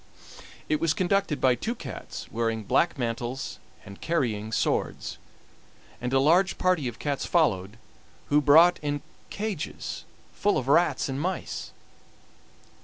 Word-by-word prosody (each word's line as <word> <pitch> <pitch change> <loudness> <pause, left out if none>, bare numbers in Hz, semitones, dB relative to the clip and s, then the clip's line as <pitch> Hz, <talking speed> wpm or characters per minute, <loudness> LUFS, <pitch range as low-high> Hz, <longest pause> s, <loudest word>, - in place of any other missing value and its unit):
It 155 - +1
was 165 -2 +2
conducted 190 -4 +1
by 130 -1 +4
two 220 - -3
cats 140 - -7
wearing 115 -1 -1
black 170 - +2
mantles 120 +1 -3 0.3
and 100 0 -11
carrying 115 -10 -1
swords, - - -1 0.8
and 125 0 -2
a 135 - +4
large 175 +7 +4
party 180 -7 +1
of 120 -2 -5
cats 145 -2 -2
followed, 105 - +1 0.5
who 150 +1 +4
brought 165 +5 +6
in 145 -1 -2 0.3
cages 205 -7 -4 0.3
full 205 - +1
of 130 - -2
rats 170 +5 +3
and 135 +1 -3
mice. 185 +3 -3
145 Hz, 130 wpm, -27 LUFS, 120-170 Hz, 0.8 s, brought